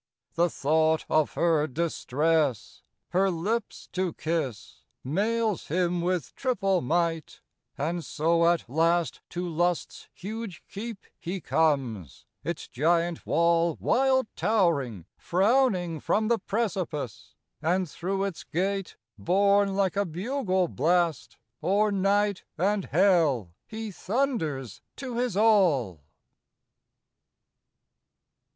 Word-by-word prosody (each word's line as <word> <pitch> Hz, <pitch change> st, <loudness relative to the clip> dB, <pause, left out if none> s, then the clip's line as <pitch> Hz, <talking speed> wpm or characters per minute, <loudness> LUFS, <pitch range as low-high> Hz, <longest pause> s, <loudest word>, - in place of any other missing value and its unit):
The 175 Hz, +1 st, +2 dB
thought 160 Hz, +2 st, +1 dB
of 155 Hz, -1 st, +2 dB
her 160 Hz, -3 st, +2 dB
distress, 155 Hz, -2 st, 0 dB, 0.3 s
her 190 Hz, +2 st, +2 dB
lips 200 Hz, +6 st, -3 dB
to 185 Hz, -3 st, -1 dB
kiss, 155 Hz, -9 st, -3 dB, 0.2 s
Mails 210 Hz, -, 0 dB
him 175 Hz, +1 st, 0 dB
with 175 Hz, -6 st, -1 dB
triple 195 Hz, -8 st, 0 dB
might; 165 Hz, +2 st, -1 dB, 0.4 s
and 165 Hz, +5 st, -2 dB
so 170 Hz, +3 st, +2 dB
at 170 Hz, -5 st, 0 dB
last 165 Hz, +5 st, +1 dB
To 175 Hz, +1 st, -4 dB
Lust's 175 Hz, +1 st, -1 dB
huge 200 Hz, -3 st, -6 dB
keep 215 Hz, 0 st, -7 dB
he 185 Hz, +3 st, -4 dB
comes; 135 Hz, -, 0 dB, 0.2 s
its 170 Hz, -1 st, -4 dB
giant 165 Hz, +4 st, 0 dB
wall, 170 Hz, 0 st, +2 dB
Wild 260 Hz, +1 st, +2 dB
towering, 160 Hz, -, +1 dB
frowning 185 Hz, -, +2 dB
from 215 Hz, +7 st, 0 dB
the 235 Hz, -, +2 dB
precipice; 185 Hz, -, -3 dB, 0.3 s
And 180 Hz, +3 st, +1 dB
through 195 Hz, +5 st, -3 dB
its 195 Hz, -4 st, -4 dB
gate, 195 Hz, +2 st, -2 dB, 0.2 s
borne 200 Hz, +2 st, +3 dB
like 195 Hz, -1 st, +1 dB
a 200 Hz, -, +2 dB
bugle 190 Hz, -, -1 dB
blast, 165 Hz, +1 st, 0 dB, 0.2 s
O'er 205 Hz, +2 st, +2 dB
night 200 Hz, 0 st, +1 dB
and 195 Hz, +3 st, +1 dB
hell 160 Hz, -, +3 dB, 0.2 s
he 220 Hz, -1 st, -6 dB
thunders 185 Hz, -, -2 dB
to 255 Hz, -3 st, -5 dB
his 245 Hz, -5 st, -1 dB
all. 170 Hz, -, +3 dB
175 Hz, 105 wpm, -27 LUFS, 160-200 Hz, 0.4 s, borne